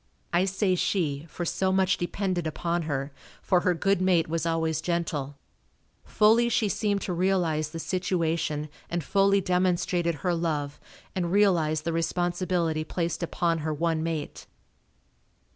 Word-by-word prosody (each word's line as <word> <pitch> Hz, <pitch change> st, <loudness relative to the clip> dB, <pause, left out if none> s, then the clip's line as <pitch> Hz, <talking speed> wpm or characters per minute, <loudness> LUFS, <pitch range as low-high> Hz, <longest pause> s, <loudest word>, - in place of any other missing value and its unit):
I 175 Hz, +2 st, +3 dB
say 190 Hz, 0 st, +1 dB
she, 165 Hz, -5 st, -1 dB
for 175 Hz, -, -4 dB
so 190 Hz, +3 st, 0 dB
much 190 Hz, 0 st, +2 dB
depended 175 Hz, -1 st, -1 dB
upon 170 Hz, +2 st, -1 dB
her, 140 Hz, 0 st, -2 dB, 0.3 s
for 180 Hz, -, +2 dB
her 180 Hz, 0 st, +1 dB
good 195 Hz, +2 st, +1 dB
mate 180 Hz, -3 st, +3 dB
was 165 Hz, +1 st, -1 dB
always 160 Hz, -1 st, 0 dB
gentle. 155 Hz, -5 st, -2 dB, 0.7 s
Fully 225 Hz, +3 st, +4 dB
she 220 Hz, -2 st, +1 dB
seemed 205 Hz, -1 st, 0 dB
to 180 Hz, -, -2 dB
realize 170 Hz, -4 st, +1 dB
the 165 Hz, -, -7 dB
situation 165 Hz, -4 st, -1 dB, 0.2 s
and 170 Hz, -1 st, -2 dB
fully 200 Hz, +3 st, +3 dB
demonstrated 180 Hz, -2 st, +1 dB
her 180 Hz, -, +2 dB
love, 150 Hz, -4 st, -2 dB, 0.4 s
and 175 Hz, -2 st, -1 dB
realized 170 Hz, -6 st, +3 dB
the 165 Hz, 0 st, -2 dB
responsibility 175 Hz, -1 st, 0 dB
placed 170 Hz, +2 st, -3 dB
upon 170 Hz, -1 st, 0 dB
her 155 Hz, +1 st, -2 dB
one 165 Hz, 0 st, 0 dB
mate. 160 Hz, -2 st, -4 dB
170 Hz, 145 wpm, -27 LUFS, 160-185 Hz, 0.7 s, Fully